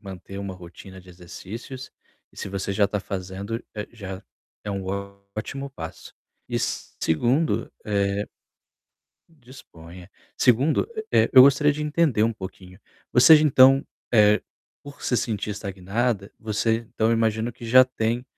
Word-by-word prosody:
manter 100 -1 -9
uma 100 -1 -5
rotina 90 +1 -12
de 90 - -19
exercícios, 105 +9 -9 0.4
e - - -25
se - - -5
você 100 0 -3
já 100 0 +2
tá 105 - -2
fazendo, 100 +3 -5
eh, 105 -1 -5
já 95 -4 -8 0.4
é 105 - -4
um 100 -1 -4 0.5
ótimo 135 +6 -5
passo. 80 -11 -9 0.3
E - - -1
segundo, 120 - -1
eh 100 0 0 1.0
disponha. 90 - -14 0.3
2º, 130 +6 +3 0.2
eh, - - +3
eu 130 -2 +10
gostaria 140 +2 +5
de 150 +1 -5
entender 150 -6 +1
um 115 +1 +2
pouquinho. 95 -3 -10 0.3
Você, 125 +7 +8
então, 135 -2 +5 0.3
eh, 105 -2 +5 0.4
por 145 0 -12
se 125 - 0
sentir 110 -2 -2
estagnada, 100 +2 -2
você 110 +2 -1
então, 110 0 +2
imagino 115 0 +1
que 120 0 -13
já 130 +3 +7
tem 120 -1 -2
110 Hz, 135 wpm, -24 LUFS, 95-125 Hz, 1.0 s, eu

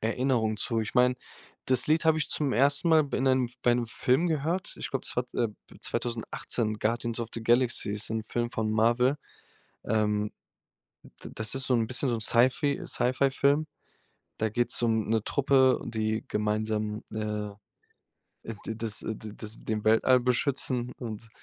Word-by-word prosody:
Erinnerung 115 -1 0
zu. 115 +1 -1
Ich 110 - -5
meine, 125 0 +4 0.5
das 130 -1 +3
Lied 155 +2 +2
habe 160 -1 +4
ich 155 - 0
zum 145 -3 +1
1. 140 +6 +3
Mal 160 -1 +6
b 140 - -4
in 130 - -1
'nem 130 -2 +2
bei 120 -1 +4
'nem 120 -1 -1
Film 130 +8 +1
gehört. 165 +4 -2
Ich - - -5
glaube, 135 - -3
es - - -3
war, 125 - +1
äh, 120 - +1 0.3
2018, 115 -2 -3
„Guardians 115 +1 -1
of 115 - -4
the 115 - -5
Galaxy“, 120 -2 +2
ist 105 +1 -4
'n 110 0 -2
Film 120 +1 -2
von 110 -2 -2
Marvel. 120 +5 +2 0.7
Ähm, 105 -1 0 0.7
d - - -13
das 110 +4 -2
ist 135 0 -1
so 130 - +2
'n 115 -2 +1
bisschen 130 +3 -1
so 120 - +1
'n 115 - -3
Sci 115 +3 +7
Fi 145 0 -2
Sci 125 - 0
Fi-Film. 140 +3 +2 0.7
Da 110 - 0
geht's 120 +3 0
um 110 -2 +1
'ne 110 -2 +1
Truppe, 135 -2 +3
die 110 0 -2
gemeinsam, 105 0 -1
äh, 105 -1 -3 1.0
äh, 115 - -5
d 110 - -3
das, 110 -1 +1
äh, 110 - -3
das 110 +1 -6
den 110 -1 -4
Weltall 115 +4 +4
beschützen 125 0 0
und, 115 -2 -7
120 Hz, 175 wpm, -28 LUFS, 110-130 Hz, 1.0 s, Sci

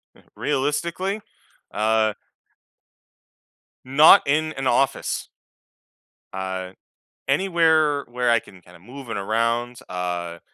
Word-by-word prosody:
Mm. - - -22
Realistically? 170 +9 -1 0.5
Uh 110 0 +2 1.7
not 150 +8 +7
in 155 +2 +1
an 135 0 -5
office. 135 +2 0 1.0
Uh, 95 -1 -4 0.6
anywhere 160 -2 +2
where 125 0 -1
I 115 -1 +4
can 95 -2 -17
kinda 90 0 -18
moving 120 +4 -8
around, 115 +4 -1
uh 90 -2 -4
120 Hz, 90 wpm, -23 LUFS, 100-150 Hz, 1.7 s, not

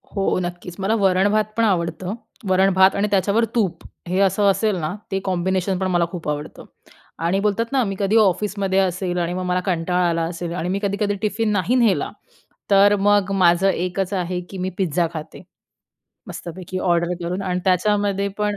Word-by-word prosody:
हो, 195 -1 +1
नक्कीच, 175 0 -6
मला 205 +4 +1
वरण-भात 200 +1 +3
पण 230 - +3
आवडतं. 180 -2 0 0.4
वरण-भात 190 0 +4
आणि 205 +1 +1
त्याच्यावर 200 +4 +2
तूप, 205 -7 0 0.2
हे 185 +2 0
असं 200 +1 +3
असेल 215 +1 0
ना, 155 +5 -3 0.2
ते 195 - 0
कॉम्बिनेशन 185 0 0
पण 190 - 0
मला 175 -1 +2
खूप 175 -4 -7
आवडतं 150 0 -5 0.6
आणि 185 +3 +1
बोलतात 210 +3 0
ना 265 -2 +2
मी 195 -3 -3
कधी 200 +2 +1
ऑफिसमध्ये 195 -1 +1
असेल, 185 -1 -1
आणि 175 0 -1
मग 185 0 -3
मला 180 0 +1
कंटाळा 180 0 +1
आला 165 0 0
असेल, 170 0 -4
आणि 180 0 -3
मी 195 +2 -1
कधी-कधी 200 0 0
टिफिन 215 +1 0
नाही 205 +4 +1
नेला 235 -6 +2 0.6
तर 200 +1 +6
मग 205 -1 +3
माझं 185 0 +4
एकच 185 +2 -2
आहे 180 -1 -2
की 195 - -7
मी 185 +1 -2
पिझ्झा 175 -2 +1
खाते. 155 -2 -8 0.9
मस्तपैकी, 180 +2 -7
ऑर्डर 170 -1 +1
करून. 180 +3 -3
आणि 180 -1 -2
त्याच्यामध्ये 200 +1 +1
पण 210 -1 0
190 Hz, 175 wpm, -21 LUFS, 180-200 Hz, 0.9 s, तर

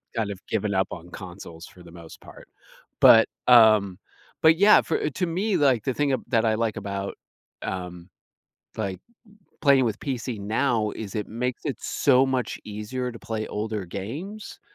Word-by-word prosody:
kind 110 -3 -1
of 95 - -8
given 105 -2 -1
up 95 0 +1
on 85 +1 -9
consoles 90 -3 -10
for 90 - -16
the 85 - -14
most 85 -1 -13
part, - - -14 0.5
but, 115 - +8 0.2
um, 110 -6 +6 0.4
but, 160 0 +5
yeah, 205 +3 +7
for 155 - -1
to 180 +6 -2
me, 190 +4 0
like, 135 -8 +2
the 130 - -1
thing 145 +2 0
ab 130 - -2
that 115 -2 +2
I 110 -1 +2
like 110 -1 -1
about, 100 -2 -4 0.5
um, 90 -1 -6 0.7
like, 100 -4 -3 0.6
playing 140 -3 +5
with 110 -2 -2
PC 125 -4 -4
now 110 +1 0
is 105 -4 -7
it 105 -2 -3
makes 125 +3 -3
it 145 -4 -2
so 135 -1 +3
much 130 -2 -2
easier 110 +5 -5
to 115 - -10
play 110 -1 -4
older 105 -1 -3
games, 145 - -7
110 Hz, 170 wpm, -25 LUFS, 100-130 Hz, 0.7 s, but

